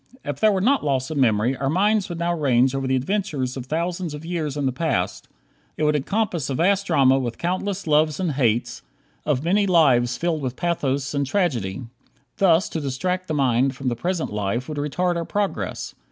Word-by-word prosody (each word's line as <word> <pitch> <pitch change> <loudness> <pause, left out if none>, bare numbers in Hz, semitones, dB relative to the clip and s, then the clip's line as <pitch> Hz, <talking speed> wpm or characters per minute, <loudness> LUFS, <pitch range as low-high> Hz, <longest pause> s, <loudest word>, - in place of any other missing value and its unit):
If 145 -1 -4
there 215 - +5
were 190 -2 0
not 270 +7 +2
loss 135 0 -1
of 155 - -3
memory 115 0 +2
our 135 0 -1
minds 205 +5 +2
would 175 - -5
now 170 +1 0
range 135 -5 +2
over 135 -1 -2
the 130 - +2
adventures 140 -3 -1
of 130 -2 -6
thousands 170 +1 -2
of 150 +2 -9
years 160 -4 -3
in 145 - -1
the 130 - +1
past. 125 - -2 0.5
It - - -1
would 150 0 +3
encompass 170 -1 -1
a 135 - -1
vast 195 +5 +2
drama 135 -5 +4
with 120 -3 -3
countless 185 +3 -2
loves 155 -1 +2
and 180 -4 0
hates, 120 -4 0 0.5
of 145 -3 +1
many 200 +4 +2
lives 130 -9 +3
filled 165 -3 -1
with 130 -2 -3
pathos 140 -5 -1
and 140 -1 0
tragedy. 130 - -1 0.5
Thus 185 -3 +4
to 160 - -3
distract 180 +7 -2
the 155 - -2
mind 130 -1 +2
from 130 0 -2
the 120 - -2
present 170 - -2
life 105 +5 -2
would 150 -2 -4
retard 175 +5 0
our 170 - -2
progress. 205 +2 -3
150 Hz, 200 wpm, -23 LUFS, 130-175 Hz, 0.5 s, there